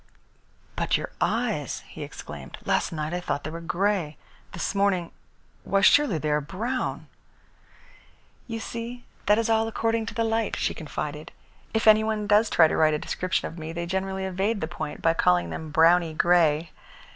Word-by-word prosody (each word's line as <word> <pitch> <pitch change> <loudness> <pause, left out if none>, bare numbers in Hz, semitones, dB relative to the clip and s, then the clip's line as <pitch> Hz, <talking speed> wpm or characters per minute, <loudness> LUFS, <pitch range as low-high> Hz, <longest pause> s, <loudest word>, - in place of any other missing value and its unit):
"But - - +1
your - - -6
eyes!" - - -1
he - - -10
exclaimed. 70 -4 -8
"Last - - +1
night 155 0 -3
I 180 - -1
thought 145 -5 -3
they 155 - -5
were 165 +1 -6
grey. 175 -2 -1 0.3
This 170 - -3
morning 195 -4 +1 0.5
why, 195 0 +1
surely 255 - +5
they 150 0 -1
are 150 0 +2
brown?" 230 - -3 1.4
"You 230 -1 -4
see, 235 +2 -6 0.2
that 210 - +5
is 230 - +1
all 225 0 +2
according 225 0 -1
to 225 - -6
the 230 - +1
light," 225 -1 0
she - - -1
confided. 150 -1 -6 0.4
"If 220 - 0
any 215 0 +7
one 220 -1 -1
does 210 +2 +4
try 160 - +6
to - - -1
write 155 -1 +4
a - - 0
description 185 +4 -2
of 165 - -9
me, 160 +1 -6
they 170 0 -3
generally 190 +1 -2
evade 195 +4 -1
the 160 - -2
point 155 -3 -6
by 165 - +4
calling 90 - +2
them 155 - -6
browny 165 +1 +4
grey. 165 -2 +3
180 Hz, 180 wpm, -26 LUFS, 160-220 Hz, 1.4 s, any